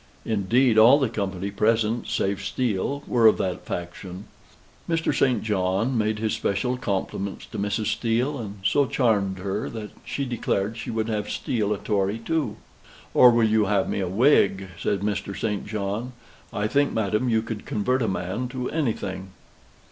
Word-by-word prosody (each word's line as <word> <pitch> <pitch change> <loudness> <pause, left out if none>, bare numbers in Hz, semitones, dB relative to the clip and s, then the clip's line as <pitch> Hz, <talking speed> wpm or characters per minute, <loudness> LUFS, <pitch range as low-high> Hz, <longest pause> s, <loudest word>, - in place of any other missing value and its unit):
Indeed, 115 +3 +3
all 120 +6 +8
the 135 -5 +1
company 100 -3 -3
present, 110 +2 +1
save 95 0 -1
Steele, 130 +6 -1
were 115 -2 +4
of 110 - +5
that 90 -2 -3
faction. 90 +2 -6 0.6
Mr. 165 -2 +1
St. 125 -6 +2
John 100 +4 0
made 110 -1 +1
his 110 0 -1
special 115 +6 0
compliments 100 -3 -3
to - - -7
Mrs. 105 +2 -1
Steele, 125 +5 0
and 105 -3 -7
so 140 +5 +3
charmed 100 -7 +1
her 100 +2 -3
that 110 -2 -7
she 140 - -3
declared 110 -3 -1
she 115 - -6
would 110 -1 -1
have 105 -2 -2
Steele 110 -5 -1
a 105 - +1
Tory 100 0 0
too. 140 -2 -1 0.6
"Or 125 - +8
will 115 -2 +4
you 110 -1 +3
have 100 -1 +1
me - - -2
a 95 - -1
Whig?" 95 -3 +3
says 100 - 0
Mr. 100 -1 -2
St. 105 -3 -2
John. 105 +4 -3 0.4
"I 105 +1 -2
think, 145 +6 +2
madam, 110 +3 0
you 110 -1 +2
could 115 -2 -6
convert 125 +5 0
a 115 - +1
man 95 +6 -2
to 125 0 -4
anything." 110 - -2
110 Hz, 170 wpm, -25 LUFS, 100-120 Hz, 0.6 s, all